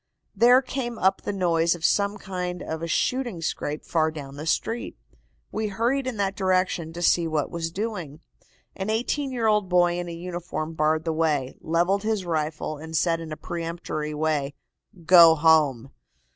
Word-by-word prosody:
There 245 +3 +6
came 245 -3 -4
up 190 -1 +2
the - - -3
noise 170 -3 +1
of 165 -1 -4
some 200 0 +2
kind 180 -3 -5
of 160 0 -5
a 165 - -3
shooting 240 +2 -1
scrape 150 -2 -3
far 160 -2 +1
down 140 -3 -8
the 150 +3 -7
street. 225 +8 -2 0.5
We 220 0 -2
hurried 240 +7 0
in 250 -4 -3
that 195 -1 -1
direction 185 -4 0
to 175 +1 -5
see 170 -1 +3
what 155 -3 -1
was 165 -1 -3
doing. 180 -6 -5 0.6
An 195 +2 -4
eighteen 260 +5 -1
year 240 -3 -2
old 210 -3 +2
boy 175 -1 +3
in 175 -1 -4
a - - -5
uniform 170 -2 -5
barred 155 +1 +1
the 165 - 0
way, 150 -5 0
levelled 175 +5 +1
his 215 -3 -1
rifle 155 -2 -2
and 160 +1 -4
said 165 +1 +1
in 165 -1 -8
a 155 - -5
peremptory 165 -3 -4
way: 150 -2 -1 0.5
"'Go 170 -1 +8
home. 150 -5 +3
170 Hz, 175 wpm, -25 LUFS, 160-200 Hz, 0.6 s, Go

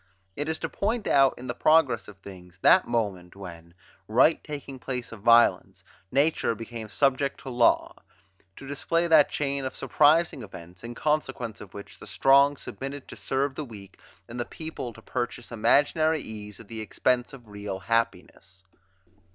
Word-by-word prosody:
It 145 +2 -3
is 160 - -1
to - - -3
point 220 +2 -2
out, 135 -2 +4
in 125 - -9
the 120 - -3
progress 140 -4 +3
of 105 - -12
things, 90 -3 -13
that - - +6
moment, 100 -7 -2
when, 85 -3 -11 0.3
right 125 +9 +4
taking 140 -3 -7
place 125 -2 -5
of 115 - -9
violence, 115 +2 +4 0.3
nature 140 -3 +1
became 115 0 -8
subject 135 +6 +1
to 135 - -7
law; 120 -2 +2 0.6
to 135 - -11
display 165 +4 0
that 160 -4 +5
chain 140 -1 -2
of 130 - -4
surprising 155 -1 +3
events, 90 -4 -12
in 120 0 -7
consequence 135 -7 -2
of 100 -2 -12
which 100 - -10
the - - -11
strong 140 +1 +4
submitted 135 +1 -7
to - - -8
serve 135 +1 -1
the 150 - -5
weak, 100 -7 -12 0.3
and 120 +1 -8
the - - 0
people 160 -6 -7
to 115 0 -16
purchase 120 -1 -4
imaginary 155 +7 +2
ease, 105 -3 -9
at 115 - -13
the 110 0 -7
expense 125 +4 0
of 125 -5 -13
real 100 -2 -6
happiness. 100 -4 -2
120 Hz, 170 wpm, -26 LUFS, 105-140 Hz, 0.6 s, that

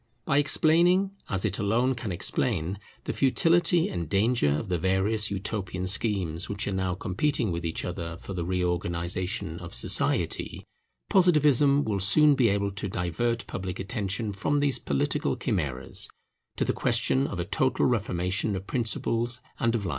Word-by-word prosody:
By 140 - +3
explaining, 170 +6 +3 0.2
as 95 0 0
it 100 -2 -1
alone 115 +6 +1
can 120 -5 -5
explain, 95 0 -1 0.2
the - - -3
futility 170 +5 +3
and 85 -4 -4
danger 105 -3 +2
of 75 +9 -1
the 90 -2 -1
various 95 +4 +1
Utopian 95 -2 -3
schemes 95 -4 +1
which 100 0 -2
are - - -1
now 95 -2 -1
competing 110 +5 -1
with 85 0 -3
each 80 -1 -3
other 85 -2 -5
for 100 - -8
the 90 -2 -3
reorganization 90 0 -2
of 90 -4 -7
society, - - +1 0.5
Positivism 150 -6 +4
will 105 -3 -1
soon 145 +11 +6
be 125 -5 +3
able 100 0 0
to 100 0 -5
divert 105 +7 -2
public 95 -1 -5
attention 100 0 -2
from 145 +9 0
these 145 -2 +1
political 70 - -1
chimeras, 65 -2 -1 0.5
to - - 0
the - - 0
question 135 +2 +1
of 95 - -6
a 85 - -2
total 130 +6 0
reformation 100 -3 -1
of 95 0 -5
principles 120 +1 -1 0.2
and 115 0 +1
of 105 -4 -2
life. - - -2
100 Hz, 160 wpm, -27 LUFS, 90-125 Hz, 0.5 s, soon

